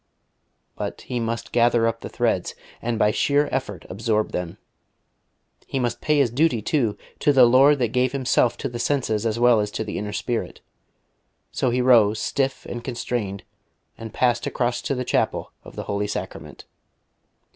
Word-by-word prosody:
But -, -, -5 dB
he 125 Hz, -, -4 dB
must 115 Hz, 0 st, -3 dB
gather 120 Hz, -1 st, +3 dB
up 115 Hz, 0 st, 0 dB
the -, -, -7 dB
threads, -, -, -1 dB, 0.3 s
and 120 Hz, -1 st, -2 dB
by 105 Hz, 0 st, +3 dB
sheer 145 Hz, +6 st, +2 dB
effort 105 Hz, -9 st, -3 dB
absorb 110 Hz, +2 st, -1 dB
them. 90 Hz, -2 st, -4 dB, 1.1 s
He -, -, -3 dB
must 120 Hz, -2 st, -1 dB
pay 150 Hz, -1 st, +2 dB
his 135 Hz, -5 st, +3 dB
duty, 135 Hz, -1 st, +2 dB
too, 115 Hz, -1 st, 0 dB, 0.2 s
to 145 Hz, -, +3 dB
the 130 Hz, -3 st, +7 dB
Lord 135 Hz, +4 st, +6 dB
that 120 Hz, -4 st, 0 dB
gave 125 Hz, +2 st, +1 dB
Himself 130 Hz, -3 st, +1 dB
to -, -, -3 dB
the 120 Hz, -, -6 dB
senses 115 Hz, -5 st, 0 dB
as 110 Hz, 0 st, -1 dB
well 120 Hz, -2 st, +5 dB
as 105 Hz, 0 st, -1 dB
to 110 Hz, -, -4 dB
the 105 Hz, -, -4 dB
inner 105 Hz, 0 st, -4 dB
spirit. 115 Hz, +3 st, -3 dB, 0.9 s
So 130 Hz, -, 0 dB
he 125 Hz, +1 st, +1 dB
rose, 115 Hz, -4 st, +5 dB
stiff 135 Hz, +4 st, -1 dB
and 120 Hz, 0 st, -6 dB
constrained, 115 Hz, -6 st, -3 dB, 0.5 s
and 115 Hz, -1 st, -8 dB
passed 120 Hz, 0 st, +1 dB
across 120 Hz, -1 st, -1 dB
to 140 Hz, -, -2 dB
the 125 Hz, 0 st, -3 dB
Chapel -, -, -1 dB
of -, -, -13 dB
the -, -, -5 dB
Holy 100 Hz, 0 st, -2 dB
Sacrament. -, -, -7 dB
120 Hz, 175 wpm, -23 LUFS, 110-130 Hz, 1.1 s, the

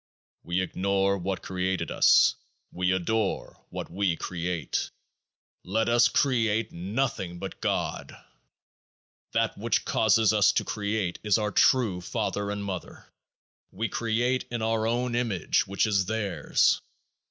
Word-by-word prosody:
We 85 Hz, +2 st, -1 dB
ignore 100 Hz, +1 st, 0 dB
what 95 Hz, 0 st, -3 dB
created 95 Hz, 0 st, -2 dB
us; -, -, +5 dB, 0.4 s
we 90 Hz, 0 st, 0 dB
adore 100 Hz, +3 st, -1 dB
what -, -, -6 dB
we 95 Hz, -1 st, 0 dB
create. 85 Hz, -4 st, -3 dB, 0.7 s
Let 110 Hz, +5 st, 0 dB
us 120 Hz, 0 st, +5 dB
create 115 Hz, -5 st, +1 dB
nothing 95 Hz, -1 st, -2 dB
but -, -, -7 dB
GOD! -, -, -2 dB, 1.2 s
That -, -, +1 dB
which -, -, 0 dB
causes 110 Hz, 0 st, +3 dB
us 105 Hz, -2 st, +4 dB
to -, -, 0 dB
create 100 Hz, -4 st, -2 dB
is 105 Hz, 0 st, +3 dB
our 105 Hz, -1 st, -1 dB
true 105 Hz, -6 st, +3 dB
father 100 Hz, +1 st, -2 dB
and 100 Hz, 0 st, -4 dB
mother; 95 Hz, -3 st, -7 dB, 0.6 s
we 110 Hz, +4 st, -3 dB
create 120 Hz, +3 st, 0 dB
in 120 Hz, -2 st, -3 dB
our 110 Hz, 0 st, +1 dB
own 120 Hz, +1 st, 0 dB
image, 115 Hz, -7 st, 0 dB
which 100 Hz, +3 st, +1 dB
is 100 Hz, -4 st, +1 dB
theirs. 110 Hz, -4 st, +1 dB
100 Hz, 130 wpm, -27 LUFS, 95-115 Hz, 1.2 s, us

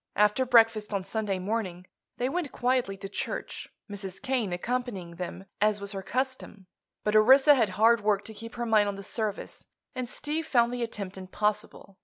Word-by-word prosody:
After 210 Hz, +5 st, +3 dB
breakfast 225 Hz, -3 st, +4 dB
on 195 Hz, -, -1 dB
Sunday 210 Hz, -1 st, -2 dB
morning 185 Hz, -2 st, -3 dB, 0.3 s
they 245 Hz, -, 0 dB
went 305 Hz, -1 st, -2 dB
quietly 245 Hz, -5 st, 0 dB
to 195 Hz, -, -7 dB
church, 200 Hz, -, -5 dB, 0.2 s
Mrs. 195 Hz, -3 st, -7 dB
Kane 255 Hz, -7 st, -1 dB
accompanying 190 Hz, -3 st, -3 dB
them, 180 Hz, +2 st, -6 dB, 0.2 s
as 210 Hz, 0 st, +3 dB
was 200 Hz, 0 st, -3 dB
her 195 Hz, -2 st, -4 dB
custom. 255 Hz, -2 st, -3 dB, 0.4 s
But 210 Hz, 0 st, 0 dB
Orissa 265 Hz, +7 st, +7 dB
had 230 Hz, -7 st, +2 dB
hard 225 Hz, +1 st, +5 dB
work 205 Hz, -1 st, +1 dB
to 220 Hz, -, -8 dB
keep 230 Hz, +2 st, -9 dB
her 240 Hz, 0 st, -2 dB
mind 215 Hz, -2 st, +4 dB
on 200 Hz, -, -2 dB
the 200 Hz, -, -8 dB
service 215 Hz, 0 st, -4 dB, 0.3 s
and 255 Hz, -2 st, -4 dB
Steve 310 Hz, +4 st, -3 dB
found 240 Hz, -4 st, +3 dB
the 245 Hz, -, -3 dB
attempt 200 Hz, -5 st, -5 dB
impossible. 205 Hz, 0 st, -3 dB
215 Hz, 180 wpm, -28 LUFS, 195-245 Hz, 0.4 s, Orissa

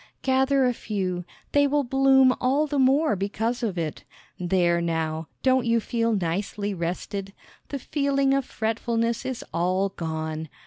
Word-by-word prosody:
Gather 265 Hz, 0 st, +3 dB
a 250 Hz, -, +2 dB
few; 185 Hz, -6 st, -3 dB, 0.3 s
they 285 Hz, 0 st, +4 dB
will 290 Hz, +1 st, +1 dB
bloom 265 Hz, 0 st, +5 dB
all 275 Hz, +4 st, +2 dB
the 290 Hz, -2 st, -1 dB
more 275 Hz, +2 st, +4 dB
because 220 Hz, +5 st, -2 dB
of 210 Hz, -6 st, -2 dB
it. 160 Hz, -3 st, -3 dB, 0.4 s
There, 175 Hz, -1 st, +2 dB
now, 160 Hz, -1 st, -2 dB, 0.2 s
don't 260 Hz, -2 st, +3 dB
you 230 Hz, 0 st, +3 dB
feel 230 Hz, 0 st, 0 dB
nicely 200 Hz, +3 st, -2 dB
rested? 190 Hz, +3 st, -4 dB, 0.4 s
The 280 Hz, -, -3 dB
feeling 275 Hz, 0 st, +1 dB
of 275 Hz, 0 st, +2 dB
fretfulness 230 Hz, +1 st, -1 dB
is 260 Hz, -3 st, -4 dB
all 185 Hz, +3 st, +1 dB
gone. 160 Hz, -3 st, -4 dB
225 Hz, 145 wpm, -25 LUFS, 180-265 Hz, 0.4 s, bloom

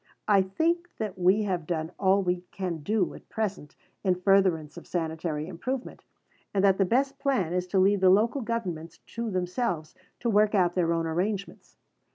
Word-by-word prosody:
I 200 Hz, -2 st, +5 dB
think 335 Hz, -, 0 dB
that 205 Hz, -4 st, -4 dB
we 190 Hz, +4 st, +4 dB
have 180 Hz, -6 st, -2 dB
done 160 Hz, -1 st, -2 dB
all 195 Hz, 0 st, +3 dB
we 180 Hz, -1 st, 0 dB
can 180 Hz, -4 st, -4 dB
do 210 Hz, +7 st, 0 dB
at -, -, -14 dB
present 200 Hz, -9 st, -3 dB, 0.3 s
in 185 Hz, -2 st, +3 dB
furtherance 180 Hz, -5 st, +2 dB
of 175 Hz, -, -11 dB
sanitary 160 Hz, -2 st, -2 dB
improvement, 235 Hz, +10 st, -5 dB, 0.5 s
and 195 Hz, -, +2 dB
that 195 Hz, -1 st, +4 dB
the 195 Hz, -, +4 dB
best 270 Hz, +8 st, +1 dB
plan 230 Hz, -, 0 dB
is 180 Hz, 0 st, -1 dB
to 185 Hz, -, -1 dB
leave 195 Hz, +1 st, +3 dB
the 190 Hz, -, +6 dB
Local 225 Hz, +8 st, +3 dB
Governments 180 Hz, -9 st, -4 dB
to 230 Hz, 0 st, -6 dB
themselves 180 Hz, -3 st, -2 dB, 0.3 s
to 240 Hz, -, -3 dB
work 210 Hz, -1 st, +3 dB
out 180 Hz, -3 st, +3 dB
their 175 Hz, -2 st, +1 dB
own 165 Hz, 0 st, 0 dB
arrangements. 190 Hz, +5 st, -3 dB
190 Hz, 180 wpm, -27 LUFS, 175-215 Hz, 0.5 s, the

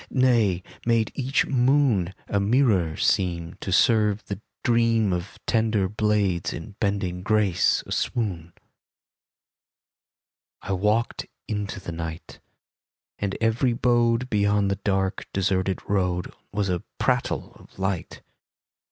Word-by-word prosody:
Nay, 115 Hz, -9 st, +2 dB, 0.2 s
made 115 Hz, -2 st, +2 dB
each 135 Hz, +1 st, +1 dB
moon 125 Hz, -8 st, +2 dB
A 100 Hz, -, 0 dB
mirror 100 Hz, -, +2 dB
seem 85 Hz, -2 st, 0 dB
To 95 Hz, -, -4 dB
serve 105 Hz, 0 st, +3 dB
the 100 Hz, 0 st, -6 dB, 0.2 s
dream 115 Hz, -4 st, +3 dB
Of 90 Hz, +2 st, -4 dB
tender 110 Hz, -4 st, +1 dB
blades 105 Hz, -4 st, 0 dB
in 100 Hz, +5 st, -8 dB
bending 100 Hz, -4 st, -1 dB
grace 105 Hz, -3 st, +2 dB
a -, -, -11 dB
swoon. 90 Hz, -8 st, -2 dB, 2.1 s
I -, -, -4 dB
walked 105 Hz, +5 st, 0 dB, 0.2 s
into 105 Hz, -2 st, -3 dB
the 95 Hz, -, -7 dB
night, 80 Hz, -1 st, -7 dB, 0.8 s
And 100 Hz, -1 st, -2 dB
every 115 Hz, +3 st, +2 dB
abode 120 Hz, 0 st, +2 dB
Beyond 100 Hz, -1 st, +2 dB
the 100 Hz, -, -1 dB
dark, 95 Hz, -1 st, -1 dB
deserted 95 Hz, -1 st, 0 dB
road 90 Hz, -3 st, 0 dB, 0.2 s
Was 100 Hz, 0 st, -1 dB
a 90 Hz, -2 st, -1 dB, 0.2 s
prattle -, -, 0 dB
of -, -, -19 dB
light. 95 Hz, -2 st, -3 dB
100 Hz, 115 wpm, -25 LUFS, 95-115 Hz, 2.1 s, serve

